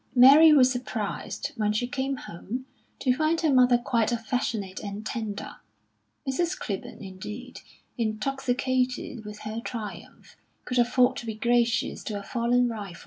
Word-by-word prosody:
Mary 280 Hz, +6 st, +9 dB
was 260 Hz, -4 st, +6 dB
surprised, 230 Hz, -5 st, -4 dB
when 210 Hz, -1 st, +1 dB
she 215 Hz, +3 st, 0 dB
came 265 Hz, +2 st, -2 dB
home, 245 Hz, +6 st, -6 dB, 0.3 s
to 255 Hz, -, +2 dB
find 315 Hz, +3 st, +1 dB
her 310 Hz, -4 st, +3 dB
mother 250 Hz, -1 st, +6 dB
quite 235 Hz, -1 st, 0 dB
affectionate 225 Hz, -4 st, -2 dB
and 205 Hz, +1 st, -6 dB
tender. 215 Hz, -3 st, -4 dB, 0.7 s
Mrs. 345 Hz, +7 st, 0 dB
Clibborn, 200 Hz, +1 st, -5 dB
indeed, 210 Hz, +7 st, -8 dB, 0.4 s
intoxicated 250 Hz, +2 st, -1 dB
with 210 Hz, 0 st, -8 dB
her 215 Hz, +1 st, -4 dB
triumph, 215 Hz, -5 st, -8 dB, 0.3 s
could 250 Hz, 0 st, 0 dB
afford 245 Hz, +1 st, +3 dB
to 235 Hz, -, -6 dB
be 220 Hz, -, -3 dB
gracious 235 Hz, +1 st, +1 dB
to 210 Hz, -, -3 dB
a -, -, -9 dB
fallen 245 Hz, +1 st, +1 dB
rival. 205 Hz, -6 st, -6 dB
240 Hz, 140 wpm, -27 LUFS, 215-255 Hz, 0.7 s, Mary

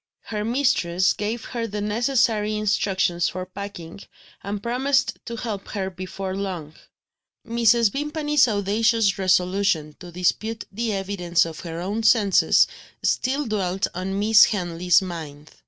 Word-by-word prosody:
Her 210 Hz, -1 st, -4 dB
mistress 215 Hz, -8 st, +1 dB
gave 220 Hz, +2 st, -4 dB
her 235 Hz, -2 st, -4 dB
the 210 Hz, -1 st, -5 dB
necessary 215 Hz, 0 st, +1 dB
instructions 195 Hz, -4 st, +1 dB
for 185 Hz, 0 st, -5 dB
packing, 185 Hz, -2 st, -8 dB, 0.4 s
and 200 Hz, +1 st, -5 dB
promised 265 Hz, +4 st, 0 dB
to 235 Hz, -, -5 dB
help 220 Hz, -4 st, -5 dB
her 190 Hz, -2 st, -3 dB
before 185 Hz, +1 st, -5 dB
long. 180 Hz, -6 st, -5 dB, 0.7 s
Mrs. 230 Hz, -1 st, +3 dB
Vimpany's 295 Hz, -1 st, +1 dB
audacious 210 Hz, 0 st, +1 dB
resolution 185 Hz, -4 st, +1 dB
to 175 Hz, -1 st, -10 dB
dispute 215 Hz, +6 st, -1 dB
the 225 Hz, +3 st, -2 dB
evidence 195 Hz, -4 st, 0 dB
of 165 Hz, -2 st, -7 dB
her 165 Hz, -1 st, -6 dB
own 205 Hz, +5 st, -2 dB
senses, 215 Hz, -4 st, +4 dB, 0.4 s
still 275 Hz, +3 st, 0 dB
dwelt 195 Hz, -4 st, -1 dB
on 185 Hz, +2 st, -3 dB
Miss 215 Hz, +1 st, +6 dB
Henley's 180 Hz, -2 st, +1 dB
mind. 155 Hz, -4 st, -8 dB
200 Hz, 130 wpm, -23 LUFS, 180-225 Hz, 0.7 s, Miss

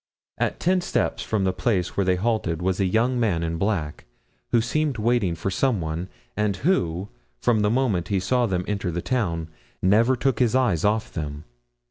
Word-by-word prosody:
At -, -, -1 dB
ten 185 Hz, +1 st, +2 dB
steps -, -, -1 dB
from 105 Hz, -3 st, -1 dB
the 95 Hz, -1 st, +1 dB
place 95 Hz, -2 st, 0 dB
where 100 Hz, -, +2 dB
they 95 Hz, -1 st, +2 dB
halted 95 Hz, -5 st, 0 dB
was 95 Hz, +1 st, -1 dB
a 100 Hz, -, +3 dB
young 120 Hz, +6 st, +1 dB
man 95 Hz, -8 st, +1 dB
in 85 Hz, 0 st, -2 dB
black, 90 Hz, -7 st, -2 dB, 0.4 s
who 120 Hz, -, +3 dB
seemed 140 Hz, +3 st, 0 dB
waiting 110 Hz, -5 st, +1 dB
for 85 Hz, +4 st, -3 dB
some 125 Hz, +2 st, +1 dB
one, 80 Hz, +3 st, -4 dB, 0.3 s
and 105 Hz, -2 st, 0 dB
who, 95 Hz, -, 0 dB, 0.3 s
from 120 Hz, -3 st, +2 dB
the 105 Hz, 0 st, +2 dB
moment 110 Hz, -8 st, +1 dB
he 100 Hz, -1 st, +1 dB
saw 125 Hz, +5 st, +1 dB
them 90 Hz, -3 st, -1 dB
enter 100 Hz, -3 st, -2 dB
the 85 Hz, +1 st, -3 dB
town, 85 Hz, -11 st, -1 dB, 0.3 s
never 110 Hz, +7 st, +4 dB
took 130 Hz, -1 st, 0 dB
his 125 Hz, -1 st, +3 dB
eyes 120 Hz, -12 st, +2 dB
off 105 Hz, +1 st, +1 dB
them. 75 Hz, -3 st, -5 dB
100 Hz, 190 wpm, -24 LUFS, 90-120 Hz, 0.4 s, never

